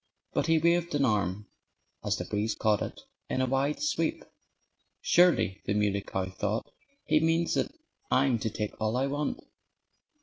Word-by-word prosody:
But -, -, 0 dB
he 165 Hz, 0 st, +4 dB
waved 170 Hz, 0 st, +2 dB
an 140 Hz, -1 st, +3 dB
arm 105 Hz, -3 st, 0 dB, 0.6 s
(as -, -, 0 dB
the -, -, -4 dB
breeze 105 Hz, +1 st, -1 dB
caught 105 Hz, -1 st, +2 dB
it) -, -, -5 dB, 0.3 s
in -, -, -1 dB
a 130 Hz, -, +3 dB
wide 135 Hz, +3 st, 0 dB
sweep. 155 Hz, +2 st, -1 dB, 0.7 s
"Surely," 175 Hz, -, +3 dB
the 100 Hz, -, +1 dB
Muley 100 Hz, -1 st, +1 dB
Cow 95 Hz, -1 st, -3 dB
thought, 105 Hz, +3 st, -2 dB, 0.4 s
"he 155 Hz, -, +4 dB
means 165 Hz, +1 st, +2 dB
that -, -, 0 dB, 0.4 s
I'm 130 Hz, -3 st, +3 dB
to 110 Hz, -, -1 dB
take 105 Hz, 0 st, -4 dB
all 110 Hz, +2 st, +1 dB
I 130 Hz, -, +2 dB
want." 145 Hz, +1 st, -2 dB
130 Hz, 165 wpm, -29 LUFS, 105-155 Hz, 0.7 s, he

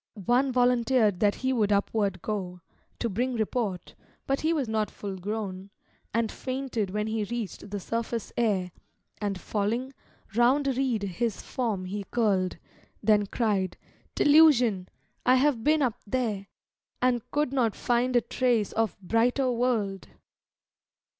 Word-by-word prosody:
One 255 Hz, +4 st, +3 dB
volunteered 245 Hz, -5 st, +3 dB
that 205 Hz, -1 st, +3 dB
he 260 Hz, 0 st, -1 dB
would 215 Hz, -4 st, +1 dB
upward 200 Hz, -2 st, 0 dB
go, 185 Hz, -4 st, -4 dB, 0.4 s
To 235 Hz, -, -1 dB
bring 245 Hz, +5 st, -1 dB
report; 215 Hz, -4 st, -2 dB, 0.3 s
but 275 Hz, 0 st, 0 dB
he 315 Hz, -, +2 dB
was 295 Hz, -7 st, 0 dB
not 220 Hz, -1 st, 0 dB
full 200 Hz, -2 st, -6 dB
grown, 195 Hz, 0 st, -5 dB, 0.4 s
And 230 Hz, -1 st, 0 dB
fainted 255 Hz, -6 st, -3 dB
when 210 Hz, +2 st, -1 dB
he 220 Hz, 0 st, -1 dB
reached 215 Hz, -1 st, -5 dB
the 205 Hz, 0 st, -3 dB
surface 230 Hz, +2 st, -3 dB
air, 195 Hz, -6 st, +1 dB, 0.5 s
And 200 Hz, -2 st, -2 dB
falling, 230 Hz, +8 st, -2 dB, 0.4 s
round 255 Hz, +5 st, +3 dB
a 270 Hz, -, +2 dB
reed 250 Hz, -5 st, 0 dB
his 200 Hz, +3 st, -2 dB
form 220 Hz, -8 st, -2 dB
he 200 Hz, +2 st, -4 dB
curled, 195 Hz, -7 st, +1 dB, 0.5 s
Then 210 Hz, -1 st, +4 dB
cried, 195 Hz, -5 st, 0 dB, 0.4 s
"Delusion! 250 Hz, -11 st, +5 dB, 0.3 s
I 255 Hz, -, +5 dB
have 260 Hz, -3 st, +2 dB
been 305 Hz, 0 st, +3 dB
up 245 Hz, -3 st, -1 dB
there. 210 Hz, -4 st, -1 dB, 0.5 s
And 250 Hz, -1 st, +2 dB
could 295 Hz, -2 st, 0 dB
not 235 Hz, -6 st, +1 dB
find 245 Hz, +1 st, +1 dB
a 240 Hz, -, +5 dB
trace 240 Hz, -6 st, +1 dB
of 225 Hz, -3 st, -1 dB
brighter 245 Hz, +6 st, +2 dB
world." 230 Hz, -5 st, -1 dB
225 Hz, 140 wpm, -27 LUFS, 200-250 Hz, 0.5 s, Delusion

